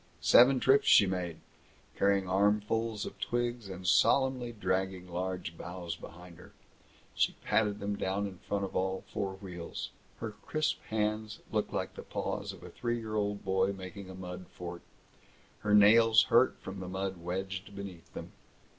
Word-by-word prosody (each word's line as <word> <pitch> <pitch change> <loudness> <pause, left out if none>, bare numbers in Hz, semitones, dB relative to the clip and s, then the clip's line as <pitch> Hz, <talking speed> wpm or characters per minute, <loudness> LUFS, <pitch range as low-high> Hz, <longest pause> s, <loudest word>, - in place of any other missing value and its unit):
Seven 130 +2 +7
trips 135 +2 +4
she 105 - +8
made, 90 -3 -2 0.6
carrying 100 -1 +2
armfuls 105 +3 +1
of - - -8
twigs 120 -3 -2
and 95 -1 -7
solemnly 130 +4 +3
dragging 95 -3 -2
large 90 -1 -4
boughs 85 -1 -6
behind 85 +1 -12
her. - - -15 0.6
She - - +1
patted 105 -2 +2
them 100 0 -2
down 95 +2 -1
in 95 -3 -7
front 100 -1 -2
of 95 - -9
all 95 0 -1
four 95 -1 -2
wheels. 90 -3 -7 0.3
Her 110 -1 -4
crisp 155 +8 -2
hands 110 0 -1
looked - - 0
like - - -2
the - - -8
paws - - -3
of - - -13
a - - -9
three 120 -1 -2
year 110 -2 -6
old 105 -1 -1
boy 95 +1 +2
making 95 0 -8
a 95 - -8
mud 90 -1 -7
fort. 85 -1 -7 0.8
Her 105 -1 +2
nails 110 +2 +7
hurt 120 +1 +4
from 95 0 -7
the 95 - -6
mud 95 0 -3
wedged 95 +3 -4
beneath 95 -4 -8
them. - - -7
100 Hz, 165 wpm, -31 LUFS, 95-110 Hz, 0.8 s, she